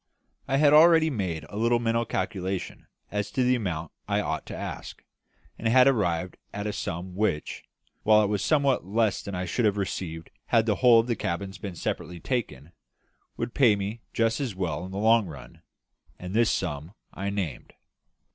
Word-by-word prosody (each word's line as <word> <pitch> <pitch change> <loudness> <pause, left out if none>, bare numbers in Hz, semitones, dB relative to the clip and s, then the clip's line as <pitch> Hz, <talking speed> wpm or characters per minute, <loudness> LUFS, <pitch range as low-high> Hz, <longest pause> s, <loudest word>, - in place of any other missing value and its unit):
I 135 - +1
had 145 0 +5
already 160 0 +7
made 90 - -3
a 105 - -8
little 115 +2 +3
mental 115 0 0
calculation 95 -2 -3 0.2
as 105 -1 -2
to 130 - +1
the 125 +1 +3
amount 85 -10 -2 0.2
I - - +1
ought - - -3
to - - -6
ask, - - -7 0.6
and 115 - -1
had 125 +3 +6
arrived 95 -8 +1
at 105 +1 -5
a 105 - -2
sum 90 0 -5
which, 95 -6 -1 0.4
while 110 0 +5
it - - +1
was 105 -1 -1
somewhat 140 0 +2
less 110 +3 0
than 100 - -6
I 90 +1 -2
should 110 +7 0
have 105 -1 +2
received 90 -4 -4 0.2
had 115 -2 +3
the 105 -3 +1
whole 120 -3 +6
of - - -8
the 120 -1 -1
cabins 95 0 -4
been 95 -2 -6
separately 90 +1 -4
taken, 85 - -3 0.7
would 115 0 -3
pay 120 -7 +5
me 100 +3 -4
just 115 +2 +1
as 125 -8 -3
well 90 -4 -2
in - - -10
the 95 - -5
long 110 0 +4
run; 75 -5 -11 0.6
and 90 +1 -7
this 115 0 +3
sum 80 +1 -3 0.2
I 100 +1 -3
named. 95 -10 -4
105 Hz, 185 wpm, -27 LUFS, 90-115 Hz, 0.7 s, already